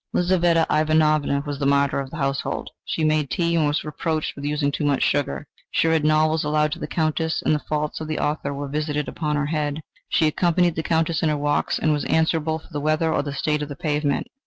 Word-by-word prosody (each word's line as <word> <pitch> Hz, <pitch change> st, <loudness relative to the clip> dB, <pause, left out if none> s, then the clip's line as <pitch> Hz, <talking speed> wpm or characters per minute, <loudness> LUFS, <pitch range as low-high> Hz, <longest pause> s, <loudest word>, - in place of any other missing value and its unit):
Lizaveta 175 Hz, -2 st, +3 dB
Ivanovna 155 Hz, -2 st, +2 dB
was 145 Hz, -2 st, -4 dB
the 140 Hz, -, +1 dB
martyr 140 Hz, 0 st, +2 dB
of 135 Hz, -1 st, -4 dB
the 155 Hz, -, -8 dB
household. 135 Hz, -1 st, -2 dB
She 160 Hz, -, -2 dB
made 155 Hz, -2 st, +2 dB
tea, 170 Hz, +5 st, 0 dB
and 155 Hz, -3 st, +3 dB
was 145 Hz, +1 st, 0 dB
reproached 155 Hz, +1 st, -2 dB
with 140 Hz, -, -9 dB
using 145 Hz, -1 st, 0 dB
too 145 Hz, -, -3 dB
much 145 Hz, -2 st, +2 dB
sugar; 135 Hz, -, 0 dB, 0.2 s
she -, -, +1 dB
read 160 Hz, -2 st, +2 dB
novels 155 Hz, +1 st, +3 dB
aloud 150 Hz, 0 st, +1 dB
to -, -, -4 dB
the 150 Hz, -, -4 dB
Countess, 160 Hz, 0 st, -1 dB
and -, -, +2 dB
the 150 Hz, -, +1 dB
faults 150 Hz, +1 st, -3 dB
of 155 Hz, -, -4 dB
the 155 Hz, -, -2 dB
author 150 Hz, -1 st, -1 dB
were 140 Hz, 0 st, -4 dB
visited 150 Hz, +1 st, -2 dB
upon 150 Hz, -2 st, -2 dB
her 145 Hz, 0 st, 0 dB
head; 150 Hz, 0 st, -2 dB, 0.3 s
she 160 Hz, -, +3 dB
accompanied 175 Hz, +2 st, +2 dB
the 160 Hz, -, -2 dB
Countess 160 Hz, 0 st, 0 dB
in 160 Hz, -, +2 dB
her 150 Hz, -, 0 dB
walks, 145 Hz, 0 st, 0 dB
and 155 Hz, -, +1 dB
was 145 Hz, -, -1 dB
held -, -, +1 dB
answerable 160 Hz, 0 st, +1 dB
for 160 Hz, -, -16 dB
the 145 Hz, -2 st, -3 dB
weather 155 Hz, +2 st, +1 dB
or -, -, +1 dB
the 145 Hz, -, -5 dB
state 150 Hz, +2 st, -1 dB
of 150 Hz, -, -4 dB
the 145 Hz, -, -6 dB
pavement. 150 Hz, -2 st, -1 dB
150 Hz, 235 wpm, -23 LUFS, 145-160 Hz, 0.3 s, Lizaveta